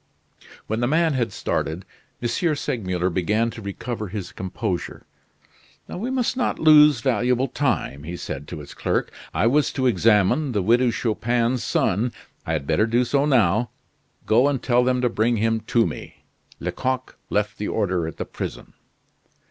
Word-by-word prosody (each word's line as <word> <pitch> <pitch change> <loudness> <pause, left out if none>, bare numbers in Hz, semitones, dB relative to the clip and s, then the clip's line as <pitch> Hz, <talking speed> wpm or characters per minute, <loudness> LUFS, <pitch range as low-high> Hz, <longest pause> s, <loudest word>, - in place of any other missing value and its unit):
When 110 +1 -2
the 120 - +1
man 160 +2 +2
had 125 -4 0
started, 85 +4 -2 0.4
M. 155 +6 +1
Segmuller 95 -9 -2
began 105 +6 +1
to 115 - -9
recover 105 +2 -5
his 100 -1 -6
composure. 95 0 -4 0.8
"We 225 +8 -4
must 260 -1 0
not 250 - 0
lose 150 -5 +6
valuable 125 +2 +1
time," 125 - -1
he 85 +4 -6
said 70 -3 -6
to 80 -4 -7
his 70 - -11
clerk. - - -1 0.2
"I - - +1
was 140 +5 +3
to 130 - -1
examine 115 - +3
the 100 -3 0
widow 120 +5 +4
Chupin's 120 +2 0
son. 110 +5 0 0.3
I 80 - 0
had 75 -3 -2
better 110 +9 +2
do 120 +2 +2
so 140 +3 +1
now. 120 -4 +3 0.6
Go 120 +5 +4
and 140 -2 0
tell 125 -1 +3
them 125 0 +1
to 125 - +3
bring 115 +1 +1
him 115 +1 +1
to 115 -2 +3
me. - - -7 0.4
Lecoq 130 0 -3
left 105 +1 -1
the 105 - -2
order 90 -6 0
at 80 - -7
the - - -3
prison." - - -7
115 Hz, 165 wpm, -23 LUFS, 100-130 Hz, 0.8 s, lose